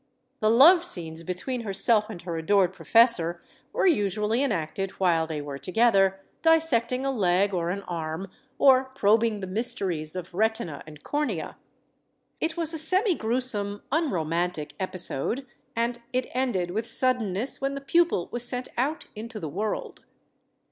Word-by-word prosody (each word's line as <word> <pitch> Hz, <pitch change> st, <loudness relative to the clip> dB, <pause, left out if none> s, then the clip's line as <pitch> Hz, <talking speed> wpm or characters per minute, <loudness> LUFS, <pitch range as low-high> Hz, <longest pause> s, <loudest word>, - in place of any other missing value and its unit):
The 215 Hz, -, +2 dB
love 320 Hz, +10 st, +7 dB
scenes 165 Hz, -, -2 dB
between 185 Hz, +9 st, -4 dB
herself 210 Hz, +1 st, +2 dB
and 205 Hz, -6 st, -7 dB
her 170 Hz, -2 st, -4 dB
adored 185 Hz, +3 st, +2 dB
professor 190 Hz, -8 st, +3 dB, 0.3 s
were -, -, 0 dB
usually 210 Hz, -, +1 dB
enacted 195 Hz, -, -1 dB
while 170 Hz, -4 st, +2 dB
they 155 Hz, -2 st, -4 dB
were 140 Hz, -1 st, -6 dB
together 195 Hz, -1 st, +2 dB, 0.2 s
dissecting 275 Hz, -6 st, +3 dB
a 275 Hz, -, +1 dB
leg 195 Hz, -3 st, +1 dB
or 170 Hz, -2 st, -1 dB
an 200 Hz, +2 st, -3 dB
arm 165 Hz, +1 st, -4 dB, 0.3 s
or 265 Hz, -1 st, +5 dB
probing 220 Hz, -1 st, +2 dB
the -, -, -3 dB
mysteries 185 Hz, -6 st, -1 dB
of 185 Hz, 0 st, -7 dB
retina 220 Hz, -6 st, -1 dB
and 150 Hz, -1 st, -13 dB
cornea. 295 Hz, 0 st, -2 dB, 0.8 s
It 325 Hz, +1 st, -2 dB
was 330 Hz, -1 st, 0 dB
a 320 Hz, -, -1 dB
semigruesome, 255 Hz, -, +1 dB
unromantic 175 Hz, -, -1 dB
episode, 185 Hz, -, -2 dB, 0.3 s
and 235 Hz, +1 st, -1 dB
it 255 Hz, 0 st, 0 dB
ended 235 Hz, -9 st, -1 dB
with 220 Hz, +4 st, -3 dB
suddenness 240 Hz, -2 st, 0 dB
when 275 Hz, +1 st, -1 dB
the -, -, -4 dB
pupil 305 Hz, -, +1 dB
was 240 Hz, 0 st, -1 dB
sent 250 Hz, +1 st, -2 dB
out 295 Hz, +6 st, -1 dB
into 220 Hz, +1 st, -7 dB
the 160 Hz, -, -5 dB
world. 210 Hz, +7 st, -4 dB
215 Hz, 145 wpm, -26 LUFS, 180-255 Hz, 0.8 s, love